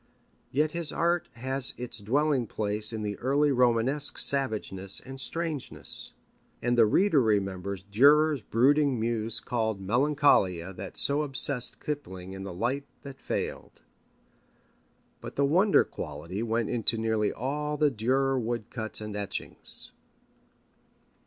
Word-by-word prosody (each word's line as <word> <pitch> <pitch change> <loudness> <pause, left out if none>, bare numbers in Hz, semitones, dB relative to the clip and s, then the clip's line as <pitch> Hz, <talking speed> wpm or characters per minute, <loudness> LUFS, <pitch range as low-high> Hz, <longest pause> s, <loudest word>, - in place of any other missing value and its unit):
Yet 150 +3 0
his 170 -2 -1
art 170 +1 0
has 130 +2 +3
its 125 -2 -4
dwelling 130 +3 0
place 105 +1 0
in 110 -1 -4
the 105 -1 -4
early 140 +3 +2
Romanesque 125 +3 +3
savageness 105 -8 +2
and 135 0 -7
strangeness. 165 -2 -4 0.5
And 120 +1 0
the 115 -2 +5
reader 165 - +3
remembers 100 -3 -1
Dürer's 145 +7 +4
brooding 135 +4 +2
muse 115 -1 -1
called 110 -5 -2
Melancholia 100 - +2
that 95 +1 -8
so 140 +1 +1
obsessed 135 -3 +1
Kipling 95 -11 -6
in 95 - -8
The 95 0 -6
Light 140 +3 -2 0.2
that 140 -1 -10
Failed. - - -5 1.4
But - - -9
the 140 - +2
wonder 185 +8 +4
quality 80 +6 -7
went 115 -1 -1
into 115 -1 +2
nearly 110 -1 0
all 150 +4 -3
the 150 -1 +2
Dürer 130 +3 0
wood 115 -1 -4
cuts 110 -3 -3
and 105 -1 -6
etchings. 100 -1 -3
120 Hz, 130 wpm, -28 LUFS, 105-140 Hz, 1.4 s, the